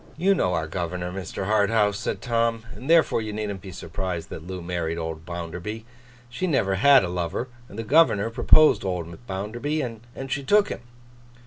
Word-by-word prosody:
'You 190 +4 +4
know 90 - +1
our 80 - -1
governor, 90 +1 -3
Mr. 95 0 -5
Harthouse,' 105 0 +2
said - - -3
Tom, 115 -1 +1
'and 130 - -9
therefore, 165 -8 +4
you 110 -1 -4
needn't 105 -2 -4
be 95 - -9
surprised 85 -1 -5
that - - -6
Loo 95 0 -5
married 85 -2 -3
old 80 -1 -5
Bounderby. 90 +6 -5 0.4
She 125 +10 -3
never 115 - +1
had 135 +7 +6
a - - -1
lover, 90 +7 -3 0.2
and 100 - -11
the 115 - -3
governor 115 -5 +4
proposed 155 +4 +5
old 90 +3 -4
Bounderby, 120 +11 -3 0.4
and 135 0 -6
she 135 +2 0
took 205 +7 +4
him. - - -4
100 Hz, 180 wpm, -25 LUFS, 90-120 Hz, 0.4 s, had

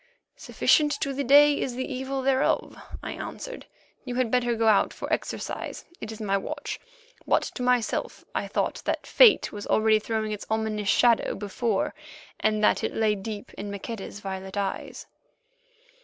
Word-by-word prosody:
"Sufficient 295 -1 +2
to 275 -2 -1
the 280 +1 -2
day 285 +2 +6
is 250 - -2
the 260 +1 -2
evil 265 0 -3
thereof," 265 0 +1 0.3
I - - -4
answered; - - -7 0.4
"you 250 -2 -5
had 250 -3 0
better 245 -1 +2
go 225 0 +1
out 215 -2 +4
for - - -4
exercise; - - -4
it 220 - -6
is 220 - -8
my 200 -2 +1
watch." 290 +8 -5 0.5
But - - +3
to - - -6
myself 250 -2 0
I - - -2
thought - - -1
that - - -1
Fate 470 -5 +6
was 205 -1 -7
already 220 0 +4
throwing 220 0 -2
its 210 - -5
ominous 220 -2 -1
shadow 235 -1 +3
before, 205 +1 -1 0.5
and 215 0 +1
that - - +3
it - - -2
lay 220 -1 +2
deep 205 +1 -6
in 205 +1 -6
Maqueda's 200 0 -6
violet 190 0 -6
eyes. 200 -1 -3
225 Hz, 165 wpm, -26 LUFS, 210-260 Hz, 0.5 s, day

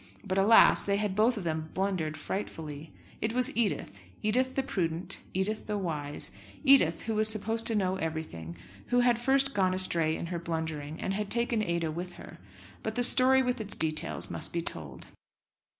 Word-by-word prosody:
But, 190 -1 0
alas! 215 +4 +7
they 200 0 +1
had 205 -2 -1
both 225 +3 +3
of 200 - -4
them 160 -1 -3
blundered 185 -5 -1
frightfully. 155 -4 -5 0.3
It 220 +1 -1
was 250 0 +1
Edith, 200 - -1 0.2
Edith 255 +5 +1
the 270 - +1
prudent, 170 -8 -2
Edith 205 +3 -2
the 210 -1 -1
wise, 150 -6 -3 0.3
Edith, 265 - +5
who 225 - -2
was 215 0 +2
supposed 225 +1 -1
to 225 - +3
know 190 -2 0
everything, 155 - -5 0.3
who 245 0 +3
had 245 -1 +3
first 270 +2 +3
gone 185 -2 +2
astray 165 -4 +1
in - - -5
her 170 - -2
blundering, 160 -2 -4
and 190 - -2
had 205 0 -3
taken 235 -1 +1
Ada 170 -5 -1
with 175 +3 -6
her; - - -12 0.4
but 220 0 -4
the 245 - +1
story 260 +2 +6
with 250 -2 -1
its 205 -1 -4
details 155 -1 -1
must - - -4
be 170 - -1
told. 75 - -5
190 Hz, 180 wpm, -29 LUFS, 160-225 Hz, 0.4 s, alas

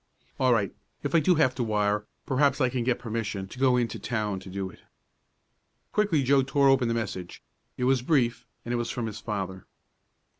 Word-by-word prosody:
"All 130 -1 +4
right, 105 -5 +2 0.3
if - - -2
I 165 - +6
do 180 +3 +3
have 140 -5 +3
to 125 - -2
wire, 105 -1 0 0.2
perhaps 140 +1 +2
I 130 -3 +3
can 125 -1 -1
get 120 0 +1
permission 110 -4 -3
to 125 - -11
go 130 -2 +4
in 120 -1 +2
to - - -6
town 105 -5 -2
to 95 0 -11
do 95 0 -3
it." - - -18 1.1
Quickly 200 -9 +2
Joe 135 +1 +4
tore 135 +1 +3
open 135 -2 +4
the 115 - 0
message. 95 -6 -5 0.3
It 125 - -2
was 130 0 +3
brief, 125 -4 +1 0.2
and 120 - -2
it - - +1
was 120 0 -2
from 120 - -3
his 110 -2 -5
father. 95 -4 -4
120 Hz, 210 wpm, -27 LUFS, 105-135 Hz, 1.1 s, I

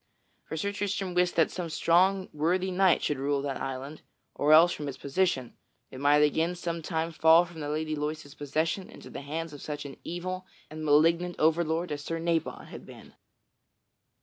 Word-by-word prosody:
For 160 - -5
Sir 200 +6 -1
Tristram 200 -2 -2
wist 180 0 +2
that 165 - +3
some 175 -3 -4
strong 185 +4 +3
worthy 180 +5 0
knight 185 -2 +3
should 145 -3 -1
rule 140 0 0
that 140 -2 -3
island, 135 +3 -5 0.3
or 145 +1 +1
else, 165 +3 +8
from 150 - -5
its 140 - -5
position, 140 -4 -1 0.4
it 130 - -9
might 145 +1 +4
again 160 +4 +1
some 170 -1 -4
time 160 0 -2
fall 160 +2 +5
from 170 -2 -11
the 145 -1 -4
Lady 155 +1 -2
Loise's 150 -1 -4
possession 160 +6 -2
into - - -12
the - - -6
hands 160 +3 -5
of 145 - -10
such 145 -1 -5
an 140 - -8
evil 185 +2 -5 0.2
and 155 0 -7
malignant 165 +4 +3
overlord 160 +1 +1
as 145 -1 -4
Sir 165 - -3
Nabon 165 -1 -2
had - - -10
been. - - -14
160 Hz, 185 wpm, -28 LUFS, 150-175 Hz, 0.4 s, else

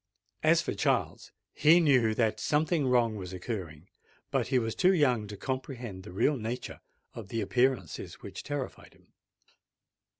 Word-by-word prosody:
As - - +4
for - - -2
Charles, - - -1 0.2
he 160 +4 +6
knew 125 -9 +3
that 110 -2 +1
something 150 -1 +1
wrong 120 -3 +2
was 95 -2 -7
occurring; 90 -5 -6 0.4
but - - 0
he 130 - +2
was 115 -2 0
too 185 +1 +4
young 125 -9 +2
to 105 0 -8
comprehend 125 -4 -5
the 95 - -11
real 135 +10 +1
nature 120 +2 -5 0.3
of 110 -4 -8
the 115 +3 -3
appearances 110 - 0
which - - -9
terrified 145 -3 -6
him. - - -28
120 Hz, 155 wpm, -29 LUFS, 105-135 Hz, 0.4 s, he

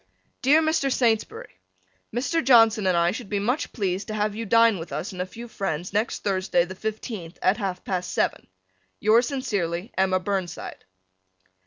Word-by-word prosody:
Dear 300 +5 +5
Mr. 315 -3 +1
Saintsbury: 225 - -1 0.5
Mr. 285 +8 0
Johnson 225 -5 +5
and 180 -2 +3
I 170 +1 +3
should 220 0 -7
be 205 - -1
much 245 +9 -1
pleased 195 -3 -2
to 215 - -4
have 210 0 0
you 225 +1 -5
dine 230 -2 +5
with 165 0 -8
us 150 +6 -4
and 180 -1 -5
a 180 - -3
few 235 +5 -9
friends 180 -6 -4
next 215 +3 -1
Thursday, 185 -3 +1
the 185 - -8
fifteenth, 210 -3 -6
at 185 +3 +2
half 190 -5 -3
past 180 -2 -2
seven. - - -1 0.5
Yours 230 +4 +4
sincerely, 200 - -2
Emma 190 0 +2
Burnside. 190 -2 -4
205 Hz, 170 wpm, -25 LUFS, 185-230 Hz, 0.5 s, Dear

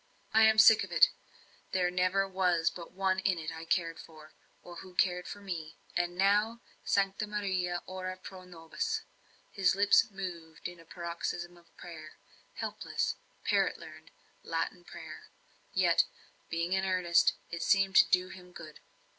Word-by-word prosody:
"I 220 0 +7
am 220 0 +5
sick 220 0 +8
of - - -8
it. - - +6 0.6
There 180 -1 +2
never 185 +2 +1
was 180 -3 +1
but 170 -2 -10
one 190 0 0
in 190 -2 +1
it 160 -1 -5
I 160 0 -8
cared 165 0 0
for, 155 -1 -13 0.3
or 175 -1 -10
who 185 0 -11
cared 180 -1 +1
for 205 - -8
me 165 -5 -6 0.2
and 175 0 -1
now 210 +4 +2 0.2
Sancta 195 +1 0
Maria, 190 -4 -2
ora 185 0 -5
pro 185 0 -11
nobis." 180 - -4 0.5
His 190 -3 +2
lips 205 +4 +4
moved 175 -5 -7
in 175 -1 -11
a 165 - -16
paroxysm 175 +1 -5
of 170 -1 -23
prayer 155 -3 -10 0.4
helpless, - - -2 0.3
parrot - - +2
learnt, - - -13 0.3
Latin - - -3
prayer; - - -10 0.4
yet, - - +3 0.4
being 170 +2 -1
in 190 0 +1
earnest, 180 -2 +3 0.2
it 170 0 -4
seemed 195 -1 +3
to - - +8
do 180 0 +2
him 180 -1 -12
good. 155 -3 -11
180 Hz, 155 wpm, -31 LUFS, 170-195 Hz, 0.6 s, sick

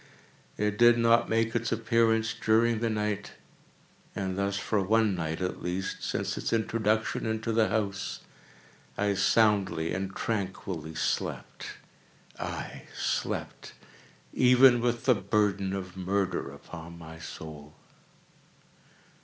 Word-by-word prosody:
It 105 0 -1
did 120 0 +7
not 115 0 +4
make 115 +1 +1
its 115 0 0
appearance 115 0 +2
during 110 +1 +2
the 115 0 0
night; 105 -2 -2 0.8
and 95 -1 -2
thus 100 +1 -1
for 105 +1 0
one 110 +1 +3
night 80 -1 -3
at 90 - -3
least, 90 +2 -3
since - - -2
its - - -2
introduction 110 -1 0
into 110 +1 -1
the 110 -1 +3
house, 100 -3 -2 0.8
I 105 0 +1
soundly 95 -5 +2
and 95 0 -3
tranquilly 95 -6 -3
slept; - - -3 0.7
aye, - - -5
slept - - -3 0.6
even 125 0 +6
with 120 -1 0
the 130 - +6
burden 100 -2 0
of 95 -2 -5
murder 95 -4 -1
upon 80 +4 -10
my 80 -1 -10
soul! 75 -2 -9
105 Hz, 120 wpm, -29 LUFS, 95-115 Hz, 0.8 s, did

